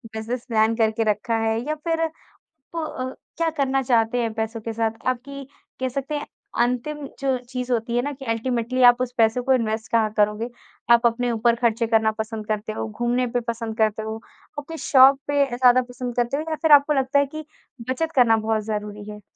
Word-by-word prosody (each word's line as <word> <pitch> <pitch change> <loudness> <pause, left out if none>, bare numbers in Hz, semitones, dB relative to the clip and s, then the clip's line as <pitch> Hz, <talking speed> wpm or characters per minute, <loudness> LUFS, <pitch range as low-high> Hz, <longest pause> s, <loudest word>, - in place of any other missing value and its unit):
Business 235 +2 -4
plan 220 0 +2
करके 225 0 +1
रखा 230 +3 -2
है 220 0 +1
या 305 - -1
फिर 325 +1 -1 0.7
प - - -3
अ, 260 -5 -4 0.2
क्या 330 -1 +1
करना 270 -1 +1
चाहते 235 -1 +2
हैं 225 -2 -2
पैसों 225 0 -3
के 225 +1 -5
साथ? 225 0 0 0.2
आपकी 275 +2 -3 0.4
कह 260 - 0
सकते 275 +3 -4
हैं 295 - -4 0.3
अंतिम 250 +5 -1
जो 270 -2 0
चीज़ 250 -1 -4
होती 235 0 -1
है - - +3
ना 290 - -2
कि 270 0 -11
अल्टीमेटली 240 +2 -1
आप 245 0 +7
उस 250 -1 -2
पैसों 230 +2 +3
को 265 - +3
इन्वेस्ट 220 -3 -1
कहाँ 220 -2 +2
करोगे? 210 +3 +1 0.4
आप 235 0 +6
अपने 240 +1 -1
ऊपर 235 +1 +2
खर्चे 230 -1 +1
करना 220 -1 +3
पसंद 220 -1 -4
करते 215 0 -2
हो, 220 - -4
घूमने 240 +3 0
पे 245 +1 -1
पसंद 230 -1 -4
करते 220 0 +1
हो, 220 0 -4 0.4
अपनी 325 +3 -8
शौक़ 270 0 +7
पे 285 -1 +3
ज़्यादा 250 0 +5
पसंद 245 -1 -6
करते 240 +3 +1
हो 305 - -2
या 315 - -1
फिर 320 - +3
आपको 290 +1 +6
लगता 270 0 +2
है 285 - +3
कि 310 0 -6 0.4
बचत 320 +5 -1
करना 230 -4 +5
बहुत 220 0 -1
ज़रूरी 210 -1 -5
है? 210 0 -10
240 Hz, 205 wpm, -23 LUFS, 225-265 Hz, 0.7 s, आप